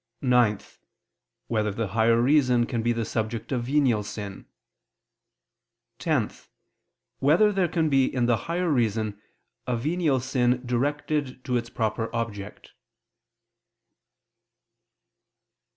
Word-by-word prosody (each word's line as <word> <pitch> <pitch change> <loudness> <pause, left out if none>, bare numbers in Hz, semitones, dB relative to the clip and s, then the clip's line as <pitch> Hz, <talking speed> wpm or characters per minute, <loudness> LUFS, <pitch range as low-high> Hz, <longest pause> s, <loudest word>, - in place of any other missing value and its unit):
(9) 125 -5 +3 0.9
Whether 110 -2 0
the 105 0 -3
higher 115 +3 +3
reason 125 -2 +3
can 115 -2 -2
be 120 +1 +1
the 115 -1 -1
subject 110 +2 -3
of 120 -3 -1
venial 130 -5 +2
sin? 105 -1 -7 1.5
(10) 140 -7 0 0.9
Whether 165 +10 +4
there 190 -3 +1
can 165 -2 0
be 135 -3 +3
in 125 -2 0
the 120 -1 +3
higher 175 0 0
reason 110 -5 0 0.5
a 125 -1 0
venial 150 +1 +1
sin 125 -1 0
directed 140 +1 -2
to 125 -2 -1
its 120 -1 -1
proper 115 -1 -2
object? 105 -3 -5
120 Hz, 110 wpm, -26 LUFS, 115-140 Hz, 1.5 s, Whether